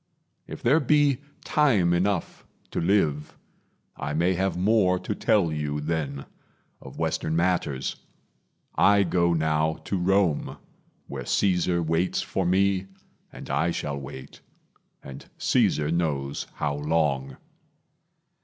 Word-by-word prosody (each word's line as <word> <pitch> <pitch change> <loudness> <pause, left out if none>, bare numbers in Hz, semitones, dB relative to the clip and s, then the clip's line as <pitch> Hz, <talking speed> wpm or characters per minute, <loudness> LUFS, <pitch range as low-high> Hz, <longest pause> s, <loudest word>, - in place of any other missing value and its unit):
If - - -9
there 140 +7 +4
be 145 -2 +3 0.3
time 110 - +3
enough 90 +1 -1 0.3
To - - -2
live, 80 -5 0 0.6
I 75 +1 -4
may 85 +4 +2
have 95 +1 -1
more 95 -1 +3
to - - -4
tell 90 -7 +2
you 75 -1 -2
then 75 -3 -3 0.6
Of - - -11
western 80 - -1
matters. 85 -6 0 0.8
I 100 0 +4
go 85 -1 +1
now 80 0 +1
to 95 - -1
Rome, 90 -3 +1 0.5
Where - - -6
Caesar 90 -3 +1
waits 80 +3 0
for 95 -2 -2
me, 95 +1 +2 0.4
and - - -10
I 85 - +1
shall 75 -4 -3
wait, 65 -1 -10 0.6
And 70 0 -11
Caesar 75 0 +1
knows 70 -5 -2
how 75 -1 -1
long. 75 -2 -1
85 Hz, 120 wpm, -26 LUFS, 75-95 Hz, 0.8 s, there